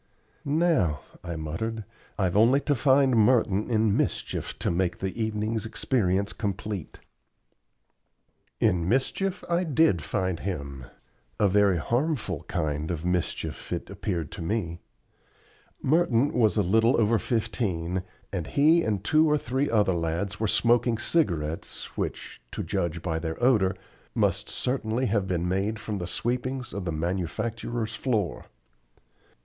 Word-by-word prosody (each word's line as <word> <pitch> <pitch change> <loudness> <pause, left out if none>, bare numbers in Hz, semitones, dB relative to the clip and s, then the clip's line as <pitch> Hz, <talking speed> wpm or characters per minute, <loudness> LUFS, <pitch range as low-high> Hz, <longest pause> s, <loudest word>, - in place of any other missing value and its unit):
"Now," 145 - +2 0.2
I 85 -1 -4
muttered, 105 +9 -3 0.3
"I've 95 -3 0
only 115 +6 +5
to 145 - +1
find 135 0 +4
Merton 110 -2 +3
in 110 -3 +2
mischief - - -2
to - - -1
make 85 0 0
the 95 -1 -3
evening's 110 0 -1
experience 100 -3 0
complete." 100 -3 -4 1.6
In 90 -1 +2
mischief 180 - 0
I 175 +1 +1
did 155 - +3
find 95 +1 -1
him 70 -9 -5 0.5
a 105 - +5
very 100 -1 +4
harmful 120 - -1
kind 75 0 -2
of 85 -1 -3
mischief, 90 -1 -2
it - - -4
appeared 85 -7 -3
to - - -7
me. 85 -2 -2 1.0
Merton 145 -3 +3
was 110 -2 +3
little 110 +5 +3
over 115 0 +3
fifteen, 95 -6 -1 0.3
and 85 -5 -2
he 155 +4 +4
and 105 -3 -1
two 155 +7 +4
or 150 - +4
three 135 +1 -1
other 105 -4 +3
lads 85 +5 -2
were 110 - +1
smoking 120 +2 +3
cigarettes 85 - -1
which, - - -4
to - - -3
judge 85 0 -2
by 80 -2 -1
their 80 0 -4
odor, 105 -7 +3 0.4
must - - +1
certainly 125 -1 -1
have 105 -4 +1
been 90 -1 -1
made 100 +4 0
from 105 -2 -4
the 85 - -4
sweepings 125 +7 -2
of 100 -2 -4
the 85 - -1
manufacturer's 110 +8 -2
floor. 110 -6 -1
105 Hz, 135 wpm, -27 LUFS, 90-120 Hz, 1.6 s, only